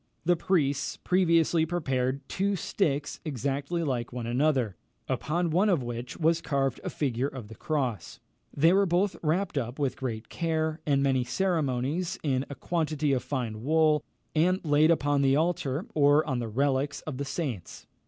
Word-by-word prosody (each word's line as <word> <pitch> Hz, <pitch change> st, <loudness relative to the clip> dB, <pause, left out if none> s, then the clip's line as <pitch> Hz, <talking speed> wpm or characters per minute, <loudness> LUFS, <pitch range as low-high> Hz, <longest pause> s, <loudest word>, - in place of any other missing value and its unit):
The 175 Hz, +1 st, +4 dB
priests 145 Hz, -5 st, 0 dB
previously 170 Hz, -3 st, +3 dB
prepared 135 Hz, -5 st, -1 dB
two 200 Hz, +1 st, 0 dB
sticks 160 Hz, -6 st, -1 dB
exactly 140 Hz, +4 st, -2 dB
like 125 Hz, -5 st, -2 dB
one 120 Hz, -1 st, -5 dB
another, 125 Hz, -4 st, +1 dB, 0.3 s
upon 170 Hz, +2 st, -1 dB
one 190 Hz, +6 st, +3 dB
of 170 Hz, -9 st, +2 dB
which 120 Hz, +1 st, -5 dB
was 165 Hz, 0 st, +2 dB
carved 135 Hz, -3 st, -1 dB
a -, -, -3 dB
figure 130 Hz, -2 st, -1 dB
of 130 Hz, -7 st, -8 dB
the 110 Hz, -, -10 dB
cross. 125 Hz, -, -3 dB, 0.3 s
They 165 Hz, +5 st, +4 dB
were 195 Hz, 0 st, +4 dB
both 180 Hz, +2 st, +1 dB
wrapped 165 Hz, 0 st, 0 dB
up 120 Hz, 0 st, -5 dB
with 140 Hz, -3 st, -1 dB
great 115 Hz, -4 st, -4 dB
care 160 Hz, -1 st, -1 dB
and 140 Hz, -1 st, +3 dB
many 130 Hz, -2 st, +2 dB
ceremonies, 155 Hz, +1 st, -1 dB
in 135 Hz, -2 st, 0 dB
a 140 Hz, -, -6 dB
quantity 155 Hz, -2 st, -1 dB
of 130 Hz, -, +1 dB
fine 115 Hz, -6 st, -3 dB
wool, 155 Hz, 0 st, +3 dB, 0.3 s
and 180 Hz, +4 st, +3 dB
laid 150 Hz, +1 st, +4 dB
upon 145 Hz, -3 st, +2 dB
the 135 Hz, 0 st, +4 dB
altar, 155 Hz, -1 st, 0 dB
or 145 Hz, 0 st, +4 dB
on 130 Hz, -4 st, -1 dB
the 120 Hz, -, -3 dB
relics 135 Hz, +4 st, 0 dB
of 150 Hz, -5 st, -6 dB
the 140 Hz, -, -2 dB
saints. 135 Hz, -, -5 dB
145 Hz, 165 wpm, -28 LUFS, 130-165 Hz, 0.3 s, The